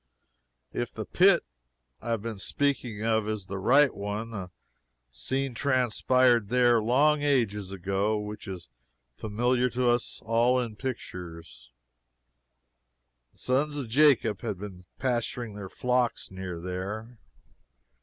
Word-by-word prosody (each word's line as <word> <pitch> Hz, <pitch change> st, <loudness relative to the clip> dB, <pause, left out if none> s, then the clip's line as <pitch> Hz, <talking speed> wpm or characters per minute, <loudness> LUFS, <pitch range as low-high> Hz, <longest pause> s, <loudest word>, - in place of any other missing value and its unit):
If -, -, -2 dB
the -, -, -4 dB
pit -, -, +4 dB, 0.6 s
I -, -, -6 dB
have 115 Hz, -3 st, -1 dB
been 115 Hz, -3 st, -5 dB
speaking 120 Hz, -2 st, -1 dB
of 110 Hz, -1 st, +1 dB
is 110 Hz, -3 st, -3 dB
the 95 Hz, 0 st, -5 dB
right 135 Hz, +8 st, +5 dB
one, 105 Hz, +3 st, -4 dB
a 95 Hz, -4 st, -5 dB, 0.6 s
scene 130 Hz, -, -2 dB
transpired 125 Hz, -3 st, +2 dB
there, 120 Hz, -1 st, +4 dB
long 145 Hz, +7 st, +3 dB
ages 110 Hz, -9 st, +1 dB
ago, 100 Hz, +3 st, 0 dB
which 105 Hz, 0 st, -6 dB
is 95 Hz, -3 st, -7 dB, 0.5 s
familiar 120 Hz, +4 st, +1 dB
to 125 Hz, +1 st, 0 dB
us 120 Hz, 0 st, -1 dB
all 120 Hz, +3 st, +3 dB
in 115 Hz, -3 st, -3 dB
pictures. 85 Hz, -, -7 dB, 1.6 s
The -, -, -23 dB
sons 145 Hz, +4 st, 0 dB
of 130 Hz, -5 st, -4 dB
Jacob 120 Hz, -6 st, +4 dB
had 110 Hz, -5 st, -3 dB
been 95 Hz, -2 st, -9 dB
pasturing 120 Hz, -3 st, -2 dB
their 100 Hz, -2 st, -7 dB
flocks 125 Hz, -2 st, 0 dB
near 95 Hz, -2 st, -6 dB
there. 100 Hz, +6 st, -5 dB
115 Hz, 125 wpm, -28 LUFS, 100-125 Hz, 1.6 s, right